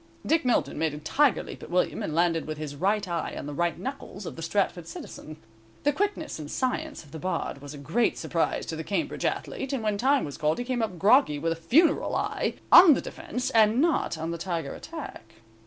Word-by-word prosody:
Dick 325 +1 +2
Milton 250 - +1
made 160 -2 0
a - - -6
tiger 265 - +2
leap - - -9
at - - -9
William, 180 +1 0
and 155 - -3
landed 165 -2 +2
with 155 -1 -4
his 150 -2 -5
right 200 +6 0
eye 170 -2 -3
on - - -5
the 145 - -5
right 170 +2 0
knuckles 265 -7 -6
of - - -6
the 165 - -8
Stratford 175 -1 -1
citizen. 155 -2 -9 0.5
The 290 - +3
quickness 400 - -2
and 150 -1 -7
science 290 - -2
of 145 - -18
the 160 - -7
Bard 165 -5 -3
was 145 +1 -8
a - - -9
great 160 - 0
surprise - - -1
to - - -4
the - - -5
Cambridge - - -2
athlete, 270 +1 -2
and 255 -5 -2
when 210 -2 0
time 270 +3 +3
was 145 - -8
called 155 +1 +1
he 245 - -3
came 250 -1 -1
up 205 -5 -2
groggy 200 - +4
with 165 +3 -1
a - - 0
funeral 285 - +3
eye, - - -1 0.2
on 345 -4 +10
the - - -1
defense, 250 0 -4
and 220 +1 +4
not 315 - +1
on 160 +1 -3
the 170 - -4
tiger 165 -5 -3
attack. - - -9
185 Hz, 225 wpm, -27 LUFS, 160-260 Hz, 0.5 s, on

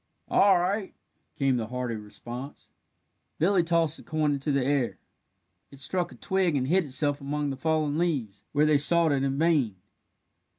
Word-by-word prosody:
"All 195 -2 +5
right," 190 +3 -2 0.4
came 135 -2 +1
the 110 -2 -3
hearty 125 0 -3
response. 120 +5 -9 0.7
Billy 180 +3 +3
tossed 165 -2 +1
the - - -13
coin 155 -2 0
into 140 +1 -1
the 140 -2 +1
air: 140 -3 0 0.7
it 140 - -14
struck 175 +6 -2
a - - -12
twig 190 -5 0
and 130 -2 0
hid 180 +3 +2
itself 145 +1 +1
among 145 +1 -2
the - - -4
fallen 155 +1 0
leaves, 135 - -2
where 150 +1 +3
they 150 -2 +4
sought 165 +2 +4
it 140 -1 +1
in 135 0 -1
vain. 150 - +2
145 Hz, 170 wpm, -27 LUFS, 135-165 Hz, 0.7 s, All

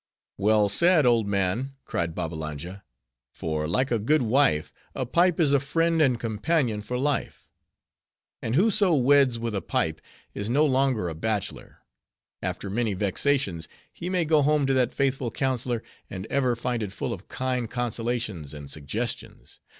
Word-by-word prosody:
"Well 105 +1 +4
said, 165 - +4
old 115 -4 +3
man," 100 +7 -1
cried 85 -1 -2
Babbalanja; 80 +4 -5 0.5
"for, 80 -1 -2
like 130 - 0
a 115 - +2
good 145 +7 +2
wife, 115 - +2 0.2
a 130 - -2
pipe 170 +7 +2
is 150 -4 +3
a 140 - +5
friend 165 +4 +1
and 130 -5 +3
companion 115 0 0
for 125 +4 -4
life. 140 +2 -2 0.9
And 115 +2 -2
whoso 195 -1 +4
weds 135 -2 +4
with 115 -1 -3
a 100 - -1
pipe, 80 -1 -1 0.3
is 100 +2 -4
no 145 +6 +4
longer 130 -8 +1
a 85 - -3
bachelor. 105 +5 -3 0.6
After - - -3
many 105 +1 -1
vexations, 100 - 0 0.3
he 175 - -5
may 180 -3 +1
go 155 -1 +4
home 150 0 +3
to 135 - +2
that 125 -2 +2
faithful 135 -3 0
counselor, 125 -3 -1 0.3
and 95 0 -6
ever 130 -3 +2
find 120 0 -2
it 105 -3 -3
full - - -3
of 95 - -10
kind 125 -3 -2
consolations 115 - -3
and 70 -1 -8
suggestions. 105 +11 -5
120 Hz, 160 wpm, -26 LUFS, 100-140 Hz, 0.9 s, a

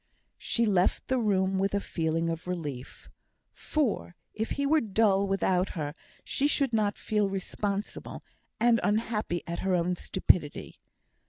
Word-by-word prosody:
She 235 - +1
left 190 -4 +1
the 260 -1 +2
room 190 -3 +1
with 195 +1 +1
a - - +2
feeling 165 -3 -1
of 165 +2 -6
relief; 150 -8 -5 0.5
for 260 - -1 0.2
if 220 +1 -3
he 280 - -1
were 310 +2 +4
dull 200 -2 +2
without 190 -1 +1
her, 145 -2 -3 0.3
she 285 - +1
should 275 -4 +1
not 210 -2 +1
feel 210 -2 0
responsible, 200 +1 -4 0.4
and 235 0 +4
unhappy 210 -4 0
at 170 0 -4
her 190 -1 +1
own 180 +1 +1
stupidity. 175 -4 0
195 Hz, 145 wpm, -29 LUFS, 180-220 Hz, 0.5 s, were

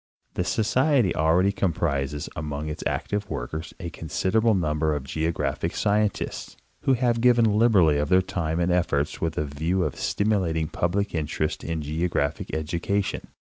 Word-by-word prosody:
The 90 - -1
Society 120 - +2
already 85 +5 +3
comprises 75 -7 -1
among 75 0 -4
its 75 - -5
active 105 0 -2
workers 80 +7 -5
a 85 -3 -5
considerable 105 +7 +1
number 75 -3 0
of 75 - -3
geographic 80 0 -2
scientists, 105 0 -1 0.2
who 135 - +2
have 120 -2 +1
given 120 -1 +5
liberally 105 -9 +4
of 75 - -1
their 95 0 +5
time 85 -3 -2
and 85 +1 +1
'efforts 80 -5 0
with 80 -2 -1
a 75 - 0
view 80 +6 -1
of - - -2
stimulating 90 -7 0
public 100 +4 -1
interest 75 -1 -2
in 80 -2 -3
geographic 75 -1 -1
education. 85 +6 -2
85 Hz, 145 wpm, -25 LUFS, 75-100 Hz, 0.2 s, given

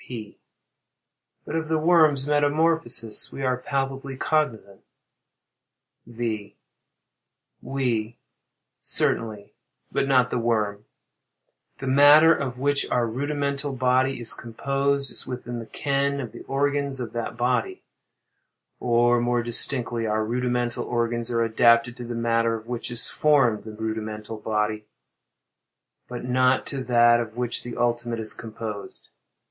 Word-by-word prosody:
P. 110 -4 -8 1.1
But 155 - -5
of 160 -1 -2
the 160 0 +1
worm's 155 -4 +4
metamorphosis 145 -6 +1
we 135 - -6
are 130 -1 +1
palpably 135 0 -3
cognizant. 120 -11 -1 1.3
V. 115 -3 -4 1.0
We, 120 -4 -2 0.6
certainly—but 110 +4 -2
not 125 -2 +3
the 125 - 0
worm. 105 -3 -1 0.9
The - - -7
matter 145 +4 +7
of 130 -5 -3
which 140 +2 0
our 120 -1 +1
rudimental 140 +3 -2
body 130 +1 +1
is 120 - 0
composed, 140 +4 -1
is - - -5
within 120 -1 -5
the 115 - -8
ken 140 0 -1
of 120 -5 -5
the - - -11
organs 140 0 -1
of 120 -3 -5
that 115 0 -4
body; 130 - -1 1.0
or, 120 0 +3
more 120 0 +1
distinctly, 120 -1 +2
our 110 0 0
rudimental 120 +1 -1
organs 120 0 -1
are 115 -1 +1
adapted 115 +1 +3
to 120 - -7
the 120 0 -5
matter 115 0 +1
of 110 0 -8
which 120 0 -5
is 120 -1 0
formed 135 - +2
the 110 - -7
rudimental 110 0 -5
body; 105 0 -1 1.2
but 125 0 -6
not 130 +1 +2
to 135 -2 -4
that 120 -1 +5
of 115 -1 -5
which 125 -1 -1
the 120 - -7
ultimate 120 -1 -1
is 110 -1 -2
composed. 110 -2 -8
120 Hz, 130 wpm, -24 LUFS, 115-140 Hz, 1.3 s, matter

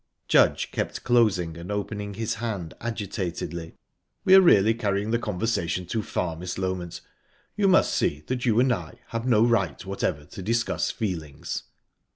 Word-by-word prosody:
Judge - - +3
kept - - -3
closing 95 -9 +2
and 85 +4 -7
opening 105 0 -3
his 110 +1 -2
hand 100 -8 -3
agitatedly. 90 -7 -4 0.5
"We 185 - +6
are 190 - +10
really 110 - +6
carrying 105 -2 -1
the 115 - +2
conversation 95 -4 -1
too 110 +5 -2
far, 85 -4 -2
Miss 90 +2 -5
Loment. 95 -2 -3 0.5
You 205 -1 +2
must 190 0 +4
see 75 +1 0
that 125 -1 -3
you 115 -1 +3
and 125 0 +4
I 85 -7 -7
have 115 +2 -3
no 115 -2 +5
right 100 -10 +1
whatever 95 -6 -2
to 95 - -9
discuss 115 +5 0
feelings." 80 - -4
100 Hz, 160 wpm, -26 LUFS, 90-115 Hz, 0.5 s, are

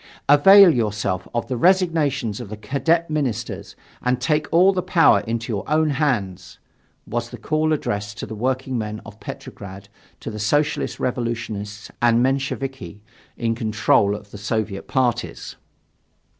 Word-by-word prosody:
"Avail 185 +5 +8
yourselves 105 -6 -1
of 120 - -1
the 130 - -2
resignations 160 - +2
of 110 - -8
the 110 - -7
Cadet 140 +10 0
ministers 125 -7 -3 0.3
and 125 0 0
take 150 +3 0
all 185 +4 +5
the 185 - -1
power 170 - +4
into 115 0 -3
your 100 - -2
own 155 0 +2
hands!" 125 - -2 0.5
was - - -3
the - - -9
call 155 0 0
addressed 105 -7 -2
by - - -4
the - - -8
workingmen 120 -2 -2
of 105 +1 -12
Petrograd 100 0 -9 0.3
to - - -6
the 105 - -7
Socialist 145 +8 0
Revolutionists 115 -4 -4
and 120 0 +4
Mensheviki 135 -7 -2 0.4
in 115 -1 0
control 105 -3 +2
of 105 -1 -11
the 105 - -9
Soviet 105 -1 -3
parties. 120 -3 -1
120 Hz, 145 wpm, -22 LUFS, 105-145 Hz, 0.5 s, Avail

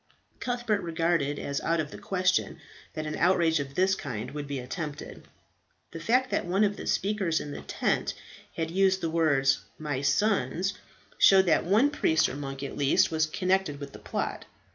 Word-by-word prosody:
Cuthbert 240 -4 -1
regarded 165 -3 0
as 140 -1 -3
out 165 0 0
of 150 -1 -3
the - - -8
question 185 -1 0 0.4
that 155 -1 -3
an 150 - -3
outrage 170 -3 +3
of 140 -1 -5
this 190 +2 +3
kind 125 - -5
would 145 0 -5
be 140 -1 -3
attempted. 145 +3 -6 0.6
The 165 - -7
fact 250 +9 +1
that - - +1
one 190 +4 +2
of 205 -1 +1
the - - -8
speakers 195 -5 0
in 145 - -6
the - - -7
tent - - -1 0.4
had 165 0 -2
used 190 +1 +2
the 165 -2 -1
words 140 -5 +3 0.2
"my 145 -4 -3
sons," 180 - +1 0.5
showed 190 -1 +7
that 170 - +2
one 220 +11 +4
priest 160 - +2
or - - -5
monk, 135 -1 -6
at 140 - -5
least, 140 +2 +3
was 155 -1 +1
connected 185 -3 0
with 140 -1 -8
the - - -10
plot. - - -4
165 Hz, 185 wpm, -28 LUFS, 145-190 Hz, 0.6 s, showed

